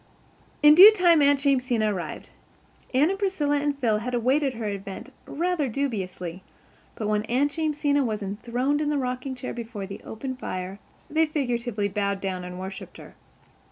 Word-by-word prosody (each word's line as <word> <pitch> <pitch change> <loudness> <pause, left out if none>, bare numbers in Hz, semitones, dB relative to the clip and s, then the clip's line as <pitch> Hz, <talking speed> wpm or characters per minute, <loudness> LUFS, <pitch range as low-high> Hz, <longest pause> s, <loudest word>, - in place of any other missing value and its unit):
In 300 0 +9
due 380 +7 +11
time 350 -6 +4
Aunt 285 0 +5
Jamesina 250 -6 +2
arrived. 180 -3 -6 0.6
Anne 285 +7 +3
and 390 - -4
Priscilla 315 -8 0
and 290 -1 -1
Phil 225 -6 +1
had 245 +3 -3
awaited 260 +3 +1
her 225 -1 -5
advent 200 +6 -6
rather 340 -2 -1
dubiously; 190 -9 -4 0.5
but 215 - -3
when 210 0 +1
Aunt 265 +6 +1
Jamesina 295 -3 +1
was 215 -4 -2
enthroned 240 +8 -1
in 295 - 0
the 295 - 0
rocking 255 0 -3
chair 255 0 -6
before 230 -4 -6
the 195 +1 -9
open 260 +4 -6
fire 185 -5 -5 0.3
they 320 +1 +2
figuratively 240 -8 -1
bowed 200 0 -1
down 185 -2 -4
and 180 0 -7
worshipped 190 +1 -8
her. - - -13
250 Hz, 165 wpm, -25 LUFS, 210-290 Hz, 0.6 s, due